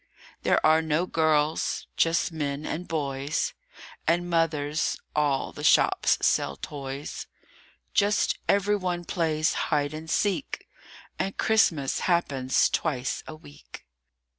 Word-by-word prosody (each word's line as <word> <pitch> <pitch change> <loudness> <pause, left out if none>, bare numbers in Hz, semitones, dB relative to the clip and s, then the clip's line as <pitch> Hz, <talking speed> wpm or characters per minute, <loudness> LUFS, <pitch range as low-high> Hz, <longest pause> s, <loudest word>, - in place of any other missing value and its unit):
THERE - - +3
are 155 +1 +5
no 160 +2 0
girls: 155 -2 +1
just 165 +1 +2
men 145 -2 -3
and 175 +3 -4
boys 140 -1 -2 0.5
And 175 +1 +2
mothers; 155 -2 0 0.2
all 145 -3 +1
the - - -8
shops - - +4
sell 70 - +1
toys; 140 - -6 0.7
Just 205 0 +2
every 200 +1 +3
one 180 -2 -3
plays 160 -3 0 0.2
Hide 145 -1 0
and 160 +1 -7
Seek, 205 - -1 0.5
And 195 - -2
Christmas 165 -11 +2
happens 140 -7 +2
twice 130 -6 -1
a 155 - -7
week. 70 - -14
155 Hz, 115 wpm, -26 LUFS, 145-170 Hz, 0.7 s, are